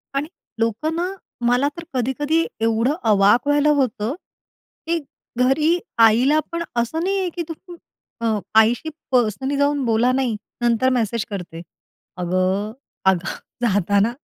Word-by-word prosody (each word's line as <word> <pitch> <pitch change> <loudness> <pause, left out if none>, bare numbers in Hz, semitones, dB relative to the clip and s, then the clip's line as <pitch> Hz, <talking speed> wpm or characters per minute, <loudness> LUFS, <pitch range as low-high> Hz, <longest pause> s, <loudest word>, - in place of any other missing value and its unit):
आणि 290 +2 -1 0.3
लोकं 230 +9 0
ना 355 +2 -1 0.3
मला 250 +4 +3
तर 340 - -6
कधी-कधी 290 +6 0 0.2
एवढं 230 +5 +2 0.2
अवाक 210 +7 +4
व्हायला 290 +1 +3
होतं, 245 -1 0 0.7
की 335 0 +1 0.5
घरी 305 +6 +3 0.3
आईला 260 +8 +3
पण 335 0 -2 0.2
असं 320 +8 -2
नाही 390 +1 0
आहे 370 -2 -1
की 340 - -2
तू - - -2 0.7
अ, - - -1 0.3
आईशी 240 +8 +2 0.2
पर्सनली 255 +3 +1
जाऊन 285 -1 +1
बोला. 230 +2 +3
नाही, 255 -4 0 0.3
नंतर 240 +2 +3
मेसेज 230 0 -1
करते. 175 -4 -6 0.6
अगं, 185 +4 0 0.3
अगं 185 -1 +2 0.3
जाताना 205 +1 +2
245 Hz, 130 wpm, -21 LUFS, 215-290 Hz, 0.7 s, अवाक